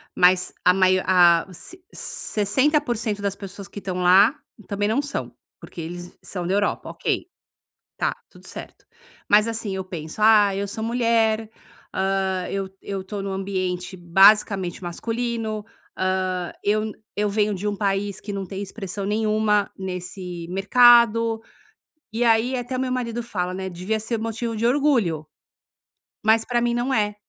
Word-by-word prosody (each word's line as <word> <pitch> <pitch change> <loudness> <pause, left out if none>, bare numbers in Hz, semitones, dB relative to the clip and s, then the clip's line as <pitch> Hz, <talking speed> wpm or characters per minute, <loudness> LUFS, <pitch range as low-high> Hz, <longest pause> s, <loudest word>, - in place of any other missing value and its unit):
mas 180 0 +4
a 180 - +6
maio 185 0 +3
a 175 -2 +5
ci 365 - -11
60% 225 -1 0
das 200 -1 -1
pessoas 195 0 -9
que 205 - -8
estão 185 -2 -4
lá 190 +8 +5 0.3
também 205 0 -1
não 235 +7 +1
são, 285 -1 -5 0.3
porque 170 - -9
eles 175 +2 -8
são 180 -3 -5
da 185 - 0
Europa, 205 0 0
ok? - - -2 0.7
Tá, - - 0
tudo - - -16
certo. - - -10 0.4
Mas 210 +2 +5
assim, 220 -3 -3
eu 190 - -3
penso: 170 +1 -7
"Ah, 210 -2 +6
eu 200 +1 -2
sou 220 +2 -5
mulher, 225 -2 +1 0.4
hã, 190 -1 0
eu 195 -1 -3
eu 195 -1 -5
tô 200 +1 -5
num 195 0 -4
ambiente 185 -1 -3
basicamente 190 +1 +4
masculino, 225 +3 -3 0.3
hã, 185 -1 -1
eu 215 +1 +1 0.3
eu 210 0 +1
venho 210 0 +1
de 200 +2 -3
um 205 - -1
país 200 0 -1
que 205 - -6
não 195 -1 -3
tem 195 +1 -6
expressão 195 -1 -5
nenhuma 210 0 +1
nesse 180 -2 -6
mercado." 230 +3 +5 0.7
E 230 +2 0
aí 230 +2 +3
até 250 +1 -4
o - - -2
meu 260 -1 -1
marido 240 -2 -2
fala, 180 -5 -3
né: 190 0 -4
"Devia 185 +5 -2
ser 225 +2 -2
motivo 225 +1 -3
de 220 +2 -1
orgulho." 235 - +2 1.0
Mas 220 +1 +4
pra 240 -1 0
mim 240 0 +1
não 245 +3 0
é. 210 -2 +1
205 Hz, 155 wpm, -23 LUFS, 185-225 Hz, 1.0 s, a